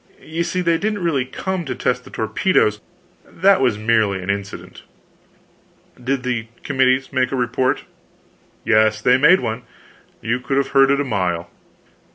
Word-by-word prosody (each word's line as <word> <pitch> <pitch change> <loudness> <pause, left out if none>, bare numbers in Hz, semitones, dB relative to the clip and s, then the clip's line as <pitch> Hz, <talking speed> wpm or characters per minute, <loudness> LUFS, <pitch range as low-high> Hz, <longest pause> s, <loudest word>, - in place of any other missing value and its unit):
You 165 +2 -3
see 180 +1 -2
they 170 -2 +1
didn't 210 -2 -2
really 140 -7 0
come 185 +7 -4
to 135 - -4
test 125 0 -1
the - - -12
torpedoes; 110 - +1 0.4
that 195 0 +2
was 120 -5 +2
merely 110 -3 +1
an 95 - -1
incident." 100 0 -7 1.2
"Did 130 +1 -1
the 120 -3 -2 0.2
committee 130 -1 +2
make 130 -2 0
a - - -1
report?" 125 +1 0 0.8
"Yes, 110 -1 +3
they 125 +4 +3
made 180 +7 +5
one. 110 +2 -3 0.6
You 115 +3 -1
could 125 +2 -2
have 140 - +1
heard 135 -1 +4
it 140 0 +2
a - - +1
mile." 90 -7 -2
130 Hz, 160 wpm, -20 LUFS, 110-145 Hz, 1.2 s, made